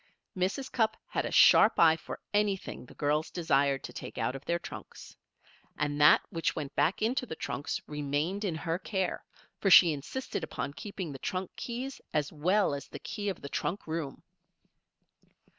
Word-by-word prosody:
Mrs. 195 +9 -1
Cupp 220 -2 +1
had - - -1
a - - -6
sharp 215 - +7
eye 160 -1 +7
for 160 - -8
anything 205 -10 -1
the - - -15
girls 150 +2 0
desired 140 -5 +1
to - - -8
take - - -8
out 130 - -1
of 135 - -8
their 170 - +1
trunks. - - -10 0.6
And 145 0 -1
that 150 - +8
which 165 -1 -1
went 145 -3 -4
back 160 +9 +2
into 250 +3 0
the 160 - -5
trunks 145 -2 -3
remained 150 +7 -2
in 185 -6 -1
her 165 +2 -2
care, 190 -3 -2 0.4
for 195 - +2
she 175 -3 +9
insisted 150 - -5
upon 140 - -4
keeping 185 +2 -6
the 135 - -8
trunk 185 +4 -3
keys 255 +3 -5
as 150 0 0
well 180 +4 +2
as 140 - -5
the - - -8
key 205 -1 -4
of 190 - -6
the 140 - -5
trunk 190 +7 -2
room. 155 -4 -4
165 Hz, 175 wpm, -30 LUFS, 145-200 Hz, 0.6 s, she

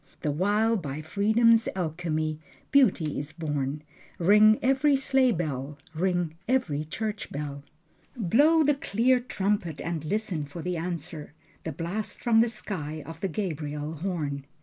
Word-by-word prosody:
The 150 - 0
while, 210 +8 +2
by 155 -4 -5
freedom's 220 +6 +3
alchemy 155 -3 -2 0.3
Beauty 190 - +3
is 145 +2 -6
born. 150 -2 -3 0.3
Ring 210 +4 +6
every 270 +2 +4
sleigh 265 -1 +3
bell, 150 - -3 0.2
ring 175 -1 0
every 175 - 0
church 210 +6 -4
bell, 140 -1 -5 0.5
Blow 290 - +4
the 295 0 +4
clear 255 -1 +2
trumpet, 200 - -1
and 165 -2 -3
listen 185 -3 -1
for 155 +3 -8
the 180 0 -2
answer: 165 -3 -5 0.3
The 160 - -2
blast 180 +7 -4
from 225 -2 +5
the 235 - +2
sky 160 -9 -5
of 165 -1 -9
the 195 - 0
Gabriel 150 -5 -3
horn. 150 -5 -3
175 Hz, 140 wpm, -27 LUFS, 155-220 Hz, 0.5 s, Ring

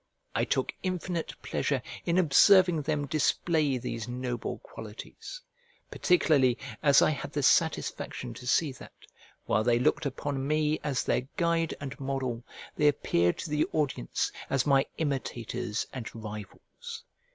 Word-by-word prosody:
I - - +1
took - - 0
infinite 180 -2 -3
pleasure - - 0 0.3
in 170 +1 +2
observing 180 +1 +6
them 150 0 -1
display 155 -1 +1
these 115 -2 -4
noble 125 0 -3
qualities; - - -9 0.5
particularly 145 -9 +3 0.2
as 140 -2 +6
I - - +4
had 145 - -5
the - - -1
satisfaction - - +1
to 125 - -10
see 145 +3 +3
that, 130 - -12 0.5
while 110 +1 +2
they 120 0 +3
looked 145 +5 +2
upon 135 0 -3
me 155 0 +1
as 140 -4 0
their - - +1 0.2
guide 170 -1 +1
and 140 0 -7
model, 135 -3 -2 0.3
they 150 - +3
appeared 85 -11 +2
to 155 - -6
the 150 0 +2
audience 145 - -1 0.2
as 135 -2 +1
my 135 -2 +4
imitators 125 -6 -2
and 125 -4 -5
rivals. 105 -3 -8
140 Hz, 140 wpm, -29 LUFS, 125-155 Hz, 0.5 s, observing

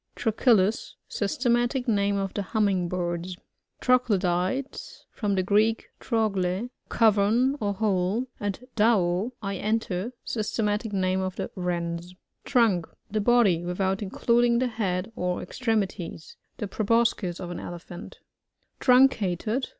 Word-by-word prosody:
Trochilus. 220 -2 +2
— - - -53
Systematic 240 +4 +1
name 200 -2 +2
of 195 -1 -2
the 205 - -2
Humming 195 -3 0
birds. 175 0 -3 0.4
Troglodytes. 215 -1 0
— - - -52
From 205 -3 -1
the 185 - +1
Greek, 215 +4 +2
tro 225 -3 +1
gUf 195 -3 -1
a 185 +7 -2 0.2
cavern 225 +4 +3
or 205 -3 -1
hole, 200 +2 0
and 205 +4 -4
dmdf 210 -1 +2
I 195 -1 -2
enter. 215 0 -1
Systematic 210 0 -1
name 190 -1 0
of 185 -1 -3
the - - -4
Wrens. 175 -1 -3 0.3
Trunk. 220 -10 +2
— - - -35
The 215 0 0
body 205 -7 +4
without 190 +3 -1
including 235 +4 +2
the 250 +1 +1
head 200 -2 -2
or 180 0 -1
extremities. 195 -7 -3 0.2
The 210 - -3
pro* 215 - -3
boscis 225 -5 +1
of 175 -1 -6
an 175 - -5
Elephant 175 0 -9 0.6
Truncated. 250 -3 +3
205 Hz, 135 wpm, -26 LUFS, 185-230 Hz, 0.6 s, body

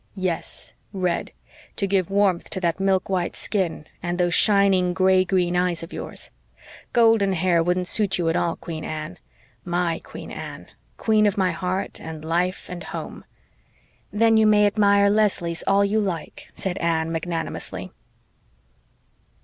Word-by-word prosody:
"Yes, 180 -4 -4 0.2
red 180 -3 -1 0.4
to 200 - 0
give 195 -2 +1
warmth 195 -3 +1
to 190 - -3
that 170 +1 0
milk 195 -1 +1
white 185 -3 -1
skin 180 -7 -2 0.2
and 175 0 -2
those 175 -1 +1
shining 195 -3 +4
gray 185 0 +4
green 180 -1 0
eyes 180 -2 0
of 165 - -9
yours. - - -6 0.6
Golden 225 -4 +4
hair 175 -1 +2
wouldn't 180 +2 0
suit 200 +1 0
you 175 -2 -1
at 165 - +1
all 170 -1 0
Queen 160 -2 -7
Anne 155 +3 -6 0.4
MY 175 -1 -1
Queen - - -9
Anne - - -8 0.3
queen 215 -1 +3
of 205 - -1
my 185 -2 +2
heart 185 +1 -3
and 160 -1 -8
life 175 +3 -1
and 180 -1 -7
home." - - -7 0.9
"Then 225 +1 +4
you 220 0 +5
may 210 -1 +5
admire 200 -1 +4
Leslie's 200 -5 +1
all 200 +1 +4
you 210 +2 +1
like," 185 -6 -4
said 190 -1 -3
Anne 165 -1 0
magnanimously. 165 0 -4
185 Hz, 150 wpm, -23 LUFS, 170-200 Hz, 0.9 s, you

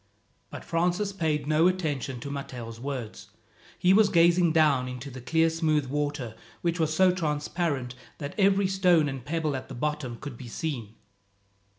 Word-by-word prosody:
But - - -9
Francis 180 +4 0
paid 155 -6 -1
no 155 +3 +4
attention 145 -8 -2
to 140 - -5
Matteo's 120 -5 -6
words. 125 -6 -6 0.5
He 180 +1 +4
was 210 0 +5
gazing 170 0 +4
down 150 -5 +3
into 125 +2 -7
the 130 0 -9
clear 160 +6 +2
smooth 160 -3 +1
water, 145 -3 -2 0.3
which 170 0 0
was 160 -1 +1
so 185 +3 +4
transparent 150 -5 -2 0.2
that 145 -2 -6
every 200 -1 +3
stone 180 -5 +3
and 135 -3 -5
pebble 155 0 -1
at 130 - -5
the - - -7
bottom 150 -3 -3
could 135 -3 -8
be 125 - -8
seen. 115 -5 -4
150 Hz, 165 wpm, -27 LUFS, 135-170 Hz, 0.5 s, was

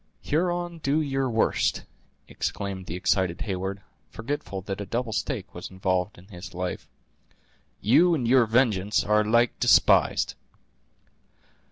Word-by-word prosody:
"Huron, 175 +1 -1
do 145 +1 +1
your 135 -3 -1
worst!" 115 -1 +1 0.4
exclaimed 95 -2 -4
the 80 - -4
excited 95 -1 0
Heyward, 95 0 -4 0.3
forgetful 115 - -5
that 95 +1 -5
a - - -4
double 115 -1 -2
stake 110 -4 -3
was 90 - -7
involved 95 +1 -1
in 90 - -15
his 90 -2 -10
life; 90 0 -4 0.9
"you 170 - +4
and 125 -6 -2
your 125 -1 +5
vengeance 105 -4 +2
are 105 +1 +3
alike 115 +3 +2
despised." - - +4
105 Hz, 130 wpm, -26 LUFS, 95-130 Hz, 0.9 s, your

